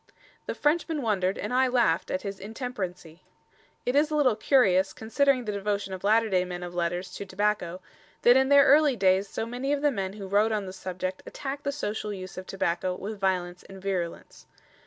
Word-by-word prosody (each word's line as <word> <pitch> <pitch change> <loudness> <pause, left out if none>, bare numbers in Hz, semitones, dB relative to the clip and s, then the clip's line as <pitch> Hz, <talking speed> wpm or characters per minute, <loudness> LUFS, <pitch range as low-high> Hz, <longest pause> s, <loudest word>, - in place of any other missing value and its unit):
"The - - -3
Frenchman 305 -1 0
wondered 195 -4 0
and 210 - -4
I 260 +1 +4
laughed 240 -10 +2
at 185 - -2
his 200 -1 -5
intemperancie." 190 - -6 0.7
It 245 - 0
is 295 +2 +4
a 305 - -2
little 265 -7 +3
curious, 195 -6 +3
considering 255 +3 +1
the 210 - -2
devotion 200 -1 -2
of 185 - -7
latter 220 +2 +4
day 185 -3 +2
men 180 -1 -6
of 175 0 -7
letters 175 +1 -2
to - - -5
tobacco, 195 -3 -1 0.4
that 245 - +7
in 265 0 +4
their 280 0 +7
early 290 -1 +5
days 190 -1 +3
so 225 - -3
many 250 +4 -3
of 290 0 0
the 295 - +4
men 195 -5 -3
who 200 -2 -7
wrote 205 +3 +3
on 210 -2 -1
the 185 - -7
subject 185 0 -5
attacked 280 +1 -6
the 280 - +1
social 210 -6 -3
use 185 -2 -7
of 185 - -8
tobacco 185 -1 -1
with 205 +2 -6
violence 180 -2 -1
and 195 0 -12
virulence. 185 -3 -4
205 Hz, 200 wpm, -27 LUFS, 185-250 Hz, 0.7 s, that